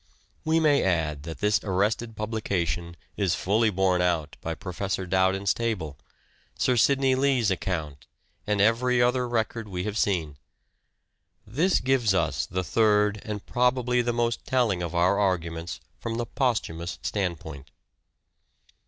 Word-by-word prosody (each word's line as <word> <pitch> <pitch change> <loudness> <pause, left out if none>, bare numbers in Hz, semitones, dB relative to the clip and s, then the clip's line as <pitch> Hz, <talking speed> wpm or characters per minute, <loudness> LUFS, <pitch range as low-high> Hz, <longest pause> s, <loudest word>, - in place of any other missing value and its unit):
We 160 +1 +2
may 150 -3 +4
add 80 -5 0
that 80 - -8
this 105 0 +2
arrested 105 +4 0
publication 90 -7 -2 0.2
is 95 -5 +1
fully 110 +4 +2
borne 95 -2 +1
out 85 -4 0
by - - -3
Professor 95 +1 -4
Dowden's 95 +2 +2
table, 105 -11 -3 0.6
Sir 125 - +2
Sidney 135 +2 +3
Lee's 130 -5 +2
account, 80 -6 -3 0.4
and 105 -1 +1
every 120 +4 +3
other 125 0 +2
record 115 -1 -2
we 90 -2 -4
have 105 +1 -2
seen. 80 -8 0 1.1
This 160 - +1
gives 125 -6 +2
us - - 0
the 95 +1 -2
third 105 0 +2
and 105 -2 -5
probably 125 0 +1
the 120 0 0
most 120 -1 -1
telling 120 -9 +1
of 85 0 -4
our 90 +4 +3
arguments 85 -4 -1 0.2
from 115 -1 -4
the 120 0 -2
posthumous 100 -10 -2
standpoint. 85 -8 -4
105 Hz, 135 wpm, -26 LUFS, 90-120 Hz, 1.1 s, may